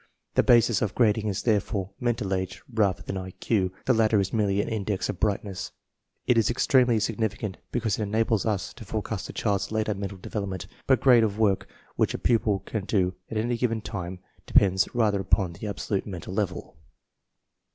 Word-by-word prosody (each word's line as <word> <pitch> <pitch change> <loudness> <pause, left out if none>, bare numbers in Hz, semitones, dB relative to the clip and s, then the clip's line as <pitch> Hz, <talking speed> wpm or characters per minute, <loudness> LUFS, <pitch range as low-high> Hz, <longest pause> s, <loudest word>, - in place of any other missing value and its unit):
The - - +4
basis 120 -3 +4
of 105 -2 -1
grading 110 -2 +3
is 100 -3 -2
therefore 100 -3 0
mental 115 -5 -1
age 95 0 -3
rather 105 -4 +1
tharul 95 -1 -5
(J. 95 -5 +1 0.2
The 130 - +4
latter 110 -2 +3
is 95 -1 -1
merely 100 -3 +1
an - - 0
index 105 -3 -2
of 100 - -4
brightness; 100 -2 -2 0.5
It 120 -2 +4
is 110 - +2
extremely 125 -1 +3
significant, 105 -2 -2
because 110 -4 -1
it - - -1
enables 110 0 +1
us 105 -4 -2
i& - - -5
forecast - - -4
a - - -7
child's 100 0 -1
later 110 -1 0
mental 100 0 -5
development, 95 0 -4 0.2
but 130 - +4
grade 125 -4 +6
of 105 -2 0
work 105 -3 +2 0.3
which - - +1
a - - -1
pupil 110 -4 +1
can 105 -4 -3
do 95 -4 +1 0.2
at 110 - -3
any 120 +2 0
given 115 -2 +1
time 95 -4 -5 0.3
de - - -12
pends 95 -1 +5
rather 105 -4 +2
upon 95 -1 +1
the 95 +6 -7
absolute 100 0 -2
mental 95 -2 -6
level. 100 -2 -3
105 Hz, 185 wpm, -26 LUFS, 95-110 Hz, 0.5 s, grade